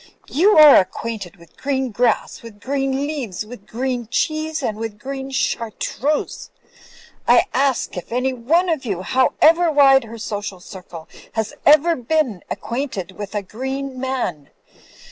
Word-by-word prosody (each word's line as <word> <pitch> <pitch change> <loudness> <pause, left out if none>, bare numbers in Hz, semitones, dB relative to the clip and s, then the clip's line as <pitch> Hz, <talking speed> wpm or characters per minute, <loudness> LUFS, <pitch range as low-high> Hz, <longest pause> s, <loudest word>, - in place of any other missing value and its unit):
You 380 +8 +4
are 300 -2 +10
acquainted 200 -1 -2
with 170 -3 -20
green 265 -2 -1
grass, 235 +1 0
with 225 -3 -12
green 270 +3 -1
leaves, 265 -9 -3
with 215 -2 -12
green 245 0 -3
cheese, 310 +3 -1
with 220 -2 -3
green 270 +3 -6
char 245 -3 -1
treuse. 290 +7 -3 0.8
I - - +6
ask 270 -2 0
if 180 - -7
any 255 +2 0
one 310 +10 +1
of 320 -5 -1
you, 195 -7 -3
however 315 - +3
wide 270 -3 +5
her 230 +1 -9
social 205 -3 -5
circle, 180 -3 -11 0.3
has 220 -1 -2
ever 310 +3 +6
been 250 - -1
acquainted 235 -7 -4
with 205 +2 -8
a 205 - -1
green 265 +5 -5
man. 250 - -3
255 Hz, 145 wpm, -20 LUFS, 210-280 Hz, 0.8 s, are